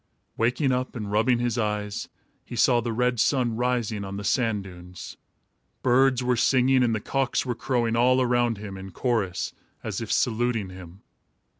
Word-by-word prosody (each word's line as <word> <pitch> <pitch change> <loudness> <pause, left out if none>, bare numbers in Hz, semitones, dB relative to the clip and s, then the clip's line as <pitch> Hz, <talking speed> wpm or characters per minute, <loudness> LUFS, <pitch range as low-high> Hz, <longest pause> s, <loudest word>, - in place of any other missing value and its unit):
Waking 125 +4 +1
up 125 0 -2
and 105 -4 -5
rubbing 115 +4 +3
his 120 0 -1
eyes, 105 -2 -2 0.3
he - - -9
saw 120 +1 +4
the 115 0 -3
red 125 +1 0
sun 120 -1 +2
rising 120 -3 -1
on 100 0 -6
the 100 - -5
sand 110 -2 +1
dunes. 90 -1 -10 0.7
Birds 130 0 +3
were 125 0 +2
singing 130 +2 +3
and 115 -2 +2
the - - -1
cocks 135 +5 -1
were 125 - -1
crowing 120 -2 -1
all 125 +2 +4
around 120 -2 +1
him, 100 -2 -7
in 95 0 -8
chorus, 105 -2 -1 0.3
as - - -4
if - - -4
saluting 115 -4 0
him. 90 +1 -12
120 Hz, 170 wpm, -25 LUFS, 105-125 Hz, 0.7 s, saw